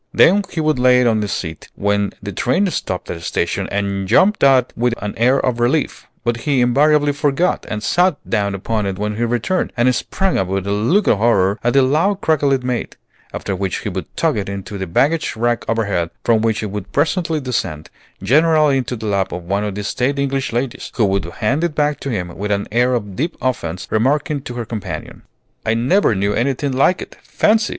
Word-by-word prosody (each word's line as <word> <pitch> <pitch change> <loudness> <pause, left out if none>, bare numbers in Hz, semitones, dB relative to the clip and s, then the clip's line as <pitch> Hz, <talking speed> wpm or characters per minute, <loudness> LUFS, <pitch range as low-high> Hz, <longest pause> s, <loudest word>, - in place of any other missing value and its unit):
Then 200 +4 +5
he 165 - -4
would 155 -4 +1
lay 125 0 +5
it - - +2
on 115 -2 +3
the 105 - -1
seat 80 -5 -5
when 100 0 0
the 100 - -4
train 130 - +1
stopped 95 - -3
at - - -4
a - - -12
station, - - -2
and 100 -1 -2
jump 210 - +4
out 130 -2 +4
with 120 0 0
an 105 - -4
air 125 +4 +3
of 125 -2 -1
relief; 130 +6 0 0.2
but 120 0 0
he 135 +3 0
invariably 145 +4 +3
forgot, 145 +5 0
and 105 0 -4
sat 175 - +2
down 100 -1 0
upon 105 +1 -2
it 95 -1 -3
when 105 +1 -3
he 120 - 0
returned, 120 +11 -1
and 125 +2 +3
sprang 190 +9 -1
up 95 - 0
with 95 0 -2
a 100 - -2
look 120 - +2
of 100 - +3
horror 100 -3 +2
at 120 - +2
the 135 -1 +5
loud 165 +9 +2
crackle 150 -6 +1
it 135 -2 +1
made; 125 -1 -3 0.4
after 100 - -3
which 95 -1 -2
he - - -3
would - - -5
tuck - - +1
it 100 -1 -3
into 100 +1 -6
the 95 - -3
baggage 150 - +1
rack 120 +1 0
overhead, 100 -7 0
from 115 -2 +3
which 110 -1 0
it 105 - -4
would 105 -2 -6
presently 160 +1 0
descend, 95 - -3 0.3
generally 150 +3 +4
into 125 -1 -3
the 110 -1 -7
lap 100 -2 0
of 90 0 -5
one 100 +4 -1
of 105 -2 -3
the 105 - -4
staid 130 +7 -1
English 135 -2 -1
ladies, 120 +1 -3
who 115 - +3
would 95 -3 0
hand 110 - -1
it 170 -3 -1
back 150 -1 +1
to 140 - -5
him 90 -8 -3
with 105 +1 -4
an 100 0 -1
air 125 +3 +2
of 105 -5 -4
deep 160 - -2
offence, 110 -9 -3
remarking 140 +6 +1
to 125 - -7
her 120 -1 -4
companion, 95 -9 -6 0.4
"I 110 - +1
never 125 - +2
knew 100 +1 0
anything 135 +3 0
like 135 +8 +2
it. - - -14
Fancy! 220 +1 +1
120 Hz, 220 wpm, -18 LUFS, 100-140 Hz, 0.4 s, Then